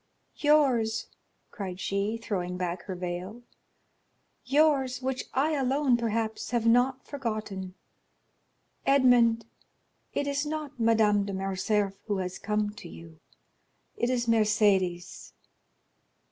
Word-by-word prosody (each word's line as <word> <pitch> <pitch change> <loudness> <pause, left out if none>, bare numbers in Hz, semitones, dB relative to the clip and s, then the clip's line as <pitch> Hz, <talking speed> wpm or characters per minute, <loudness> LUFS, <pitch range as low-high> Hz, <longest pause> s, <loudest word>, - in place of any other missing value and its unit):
"Yours!" 260 -7 +3 0.5
cried 190 -3 -6
she, 200 +3 -1
throwing 180 -5 -3
back 180 -1 -3
her 190 - -5
veil,—"yours, 245 - -3
which 260 0 -3
I 285 +4 +2
alone, 275 -2 +2
perhaps, 225 -1 -2
have 235 -2 0
not 245 +3 +3
forgotten. 215 -8 -5 1.1
Edmond, 245 -4 +4 0.7
it 285 - -1
is 280 0 -1
not 300 -3 -5
Madame 220 -3 +3
de 200 - -4
Morcerf 195 +1 -1
who 205 -2 0
is 185 -1 -4
come 210 0 -1
to 210 - -11
you, 80 0 -13 0.8
it 240 - 0
is 245 -1 0
Mercédès." 210 -6 +1
225 Hz, 105 wpm, -28 LUFS, 195-255 Hz, 1.1 s, Edmond